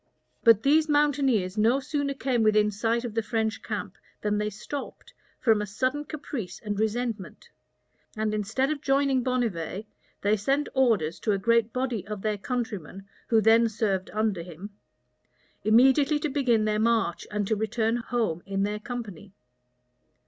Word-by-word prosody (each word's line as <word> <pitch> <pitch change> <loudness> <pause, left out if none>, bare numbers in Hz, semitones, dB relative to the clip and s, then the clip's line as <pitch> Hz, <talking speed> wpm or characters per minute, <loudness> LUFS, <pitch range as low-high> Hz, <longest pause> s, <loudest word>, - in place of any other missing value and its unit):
But 230 -2 +6
these 305 +3 +4
mountaineers 270 -10 +2
no 235 +5 +4
sooner 285 0 -2
came 255 -3 0
within 215 -1 +3
sight 230 +4 -1
of 230 - -5
the 225 - +1
French 220 -1 -2
camp, 210 -3 -5 0.2
than 210 0 0
they 210 0 -1
stopped, 215 +7 -8 0.3
from 220 -4 +3
a 210 - -3
sudden 255 +8 -1
caprice 280 - -6
and 205 -1 -2
resentment; 220 -2 -3 0.7
and 215 0 0
instead 220 +7 0
of 295 -2 -3
joining 275 -2 +2
Bonnivet, 220 -7 -2 0.4
they 210 +2 +3
sent 275 +8 0
orders 220 - +2
to 215 - 0
a - - +1
great 230 +2 +2
body 250 -5 -2
of 210 -2 -6
their 210 -2 -1
countrymen, 205 - -4 0.2
who 225 -2 +4
then 225 +2 +5
served 205 -4 -1
under 215 -4 0
him, 180 +4 -9 0.9
immediately 265 +7 +5
to 300 +1 -2
begin 250 -6 +2
their 215 0 +1
march, 225 -6 +1
and 210 -1 -1
to 220 - +1
return 220 +2 0
home 230 -8 -2
in 195 0 -1
their 210 +1 -2
company. 210 -5 -7
225 Hz, 155 wpm, -27 LUFS, 210-255 Hz, 0.9 s, But